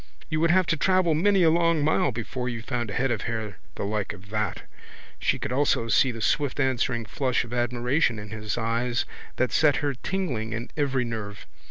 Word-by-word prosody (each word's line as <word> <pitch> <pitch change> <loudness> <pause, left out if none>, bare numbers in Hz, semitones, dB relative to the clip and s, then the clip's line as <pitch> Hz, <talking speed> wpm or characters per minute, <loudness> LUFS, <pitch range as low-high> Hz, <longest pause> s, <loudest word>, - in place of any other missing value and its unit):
You 155 - +1
would 165 +1 +3
have 185 +2 +4
to 165 - +1
travel 185 -1 +3
many 190 +4 +3
a 160 - +6
long 170 -2 +3
mile 145 -2 +2
before 125 +2 -4
you 115 -2 -5
found 120 -2 -2
a 100 - -4
head 135 0 +1
of 110 -4 -1
hair 110 -4 -4 0.2
the - - -4
like 105 0 -2
of 100 +3 -14
that. 105 -3 -2 0.6
She - - +1
could - - -4
almost 125 -4 +2
see 130 - +4
the 115 -1 -7
swift 145 +4 +1
answering 125 -3 +1
flash 125 +2 0
of 120 0 -9
admiration 120 +2 +1
in 105 0 -7
his 110 0 -4
eyes 120 +1 0 0.3
that 130 0 +1
set 150 -2 +4
her 145 -1 0
tingling 130 - -3
in 115 +1 -5
every 135 -4 +1
nerve. 105 -3 -6
125 Hz, 205 wpm, -26 LUFS, 115-145 Hz, 0.6 s, a